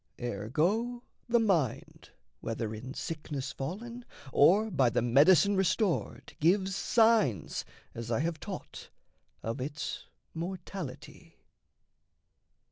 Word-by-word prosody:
Ergo, 160 - -1 0.3
the 240 - +5
mind, 175 - 0 0.3
whether 115 -1 -3
in 120 +4 -7
sickness 145 -4 -4
fallen, 230 - -6 0.3
Or 205 +9 +5
by 135 -7 +3
the 115 - 0
medicine 150 +10 +5
restored, 190 0 0
gives 190 +4 +2
signs, 205 - +2 0.3
As 115 0 -6
I 120 +3 +1
have 165 0 -2
taught, - - -8 0.5
of 115 +4 -3
its 150 +3 -5 0.3
mortality. 165 -3 -7
160 Hz, 100 wpm, -30 LUFS, 130-195 Hz, 0.5 s, the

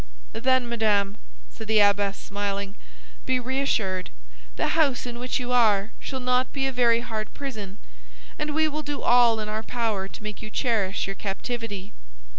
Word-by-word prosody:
"Then, 255 +1 +2
madame," 210 -4 +1 0.4
said 220 - -8
the 220 0 +4
abbess, 200 -1 +4
smiling, 200 0 -3 0.5
"be 260 -1 +2
reassured; 245 -8 0 0.5
the - - 0
house 295 -7 +2
in 240 -1 -6
which 250 +2 -1
you 250 0 -3
are 215 -4 +4
shall 265 - -4
not 250 0 +1
be 270 -1 -1
a 270 - +1
very 235 -2 +3
hard 220 -2 -4
prison, 215 -9 -6 0.6
and 300 0 -2
we 315 0 +4
will 305 0 -2
do 290 -1 -4
all 240 -2 +5
in 215 - -3
our 215 +1 -2
power 220 -4 -1
to 205 - -11
make 210 -1 -6
you 215 - -6
cherish 215 -5 0
your 195 - -4
captivity. 205 0 -4
230 Hz, 170 wpm, -26 LUFS, 205-250 Hz, 0.6 s, all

